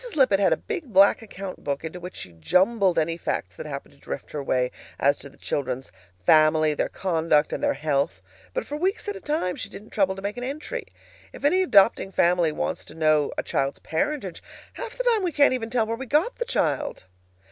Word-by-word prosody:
Lippett 255 -9 +4
had 200 - +3
a - - +3
big 345 - -5
black 195 +3 +6
account 195 -3 -8
book 140 +1 -2
into 160 +3 -6
which 180 +1 -8
she 90 - -8
jumbled 185 - +2
any 165 +1 +1
facts 95 - -3
that 155 - -7
happened 140 -2 -7
to 140 - -24
drift - - -7
her 150 - -3
way 125 -2 0 0.3
as 140 +1 +4
to 140 - -10
the - - -21
children's 130 -6 -3 0.3
family, 155 - +5
their - - -1
conduct, 160 -4 +1
and - - -3
their - - +2
health. 145 +1 0 0.3
But - - -3
for 295 - -5
weeks 380 +7 -1
at 410 - -2
a 395 - -8
time 295 - -1
she - - -5
didn't 210 +2 -12
trouble 190 -2 +1
to 195 - -8
make 205 +3 -3
an 245 - -4
entry. 305 - -5 0.5
If - - -6
any 365 +6 +4
adopting 200 - +4
family 175 -3 +3
wants - - -3
to 155 - -13
know 155 -2 +3
a - - -1
child's 135 0 -1
parentage, 195 - -2 0.3
half 475 -1 -7
the - - -1
time 470 -4 +3
we 360 -2 0
can't 285 -3 +4
even 230 -3 -3
tell 235 -2 +1
where 225 +1 -2
we 265 +1 -6
got 310 - +1
the 480 - -2
child! 300 - -1
190 Hz, 220 wpm, -25 LUFS, -, 0.5 s, black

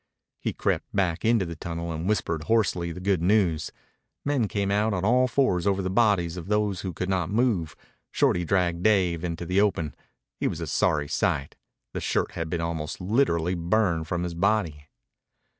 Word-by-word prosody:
He - - -2
crept - - -1
back 90 -4 0
into 115 -4 +3
the 85 -1 -6
tunnel 85 +1 -5
and 80 +4 -3
whispered 85 -7 -1
hoarsely 100 -6 +1
the 90 - -7
good 95 -2 +1
news. 90 -5 +2 0.6
Men 140 -6 +1
came 100 -1 -1
out 105 +1 +1
on 90 +1 -1
all 125 +3 +4
fours 115 -8 +1
over 100 -1 +1
the 95 - -2
bodies 95 -6 +2
of 85 0 -7
those 105 -2 0
who 95 - -4
could 90 +1 -4
not 90 -3 0
move. 105 -7 0 0.3
Shorty 90 - +2
dragged 85 -1 +1
Dave 90 -5 +2
into 85 0 -3
the 90 +3 +2
open. 85 -7 0 0.5
He - - +1
was - - -3
a - - -3
sorry 75 -1 +1
sight. 70 -1 -1 0.4
The - - -3
shirt - - 0
had 80 -1 -4
been 85 0 -2
almost 80 -2 -3
literally 90 -4 +1
burned 85 -2 +1
from 85 +1 -2
his 90 -1 -3
body. 85 -5 0
90 Hz, 185 wpm, -26 LUFS, 85-105 Hz, 0.6 s, all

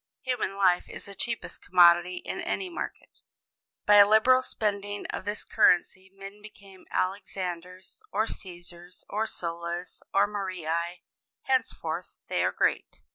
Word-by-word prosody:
Human 250 -7 -1
life 185 -3 +3
is - - -8
the 200 - -9
cheapest 230 +3 -3
commodity 175 +1 +5
in - - -4
any 380 - -2
market. - - -7 0.7
By 205 0 +7
a 200 0 +9
liberal 255 +4 +6
spending 205 -4 -2
of - - -5
this 205 +1 -3
currency 190 +2 +3
men 195 +1 -11
become 195 -3 -15
Alexanders 185 - -4
or 220 - +1
Cæsars, 175 -3 -7
or 215 +2 -1
Sullas, 170 -1 -5
or 200 +1 +4
Marii: 175 -4 -3 0.4
henceforth 260 -1 -1 0.2
they - - +1
are - - +2
"Great." - - -1
195 Hz, 130 wpm, -28 LUFS, 175-210 Hz, 0.7 s, a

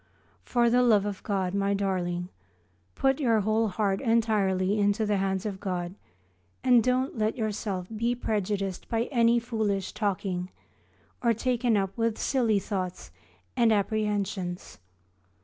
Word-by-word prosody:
For 235 - +1
the 250 +1 +4
love 215 -5 +4
of 205 -1 -4
God, 190 -3 -1
my 200 0 +1
darling, 180 -3 -2 0.7
put 270 +1 +2
your 230 -6 +3
whole 215 +2 +1
heart 195 0 0
entirely 210 -4 +1
into 205 +2 +2
the 205 -1 +1
hands 190 0 -1
of 200 -3 -4
God 180 -2 -3 0.7
and 245 -3 +5
don't 255 0 0
let 215 +2 0
yourself 210 -4 -2
be 235 +3 0
prejudiced 200 -4 -2
by 230 -1 +1
any 235 -2 +4
foolish 220 -5 -1
talking, 190 -3 -2 0.7
or 235 -2 +2
taken 240 -1 +1
up 195 -1 -1
with 230 -1 0
silly 235 -6 +1
thoughts 185 -2 -4 0.4
and 235 -3 +4
apprehensions. 205 -3 -1
210 Hz, 135 wpm, -27 LUFS, 195-230 Hz, 0.7 s, and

